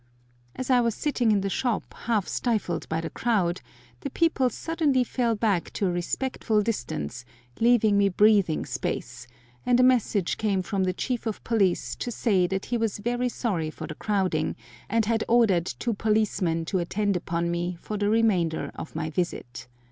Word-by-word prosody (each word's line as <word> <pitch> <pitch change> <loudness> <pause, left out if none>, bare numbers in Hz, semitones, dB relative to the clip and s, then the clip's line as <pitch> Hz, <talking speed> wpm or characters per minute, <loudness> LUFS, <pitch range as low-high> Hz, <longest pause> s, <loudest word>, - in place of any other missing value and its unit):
As 260 0 -3
I 250 -1 +5
was 230 -2 0
sitting 250 -6 +1
in 205 -2 +3
the 195 - -1
shop, 245 +1 -1
half 220 -5 -1
stifled 215 -8 -1
by 160 0 -1
the 165 - -5
crowd, 190 -7 0 0.4
the 280 - -4
people 275 -4 +2
suddenly 300 -4 +1
fell 240 -1 0
back 205 -5 0
to 200 - -1
a 180 - +1
respectful 210 +4 -1
distance, 120 - -3 0.4
leaving 225 -3 +4
me 200 0 +4
breathing 200 -4 +3
space, - - -4 0.4
and 245 0 +3
a - - +6
message 230 -7 +2
came 200 -4 +1
from 195 -1 -1
the 185 - +1
chief 240 +4 -3
of 220 - -4
police 200 -6 +1
to - - -4
say 200 -6 +2
that 190 +1 -3
he 240 - -1
was 225 -3 -1
very 245 +4 -1
sorry 185 -11 -2
for 155 - -7
the - - -6
crowding, 185 -7 0 0.3
and 225 0 +2
had 225 0 +1
ordered 210 -8 +3
two 235 - -2
policemen 200 -6 0
to 185 +3 -1
attend 200 +3 0
upon 170 0 -1
me 175 +1 -2
for 215 - -5
the 205 0 0
remainder 200 -8 +1
of 160 - -8
my 160 -1 -3
visit. 140 -8 -4
210 Hz, 180 wpm, -26 LUFS, 175-235 Hz, 0.4 s, a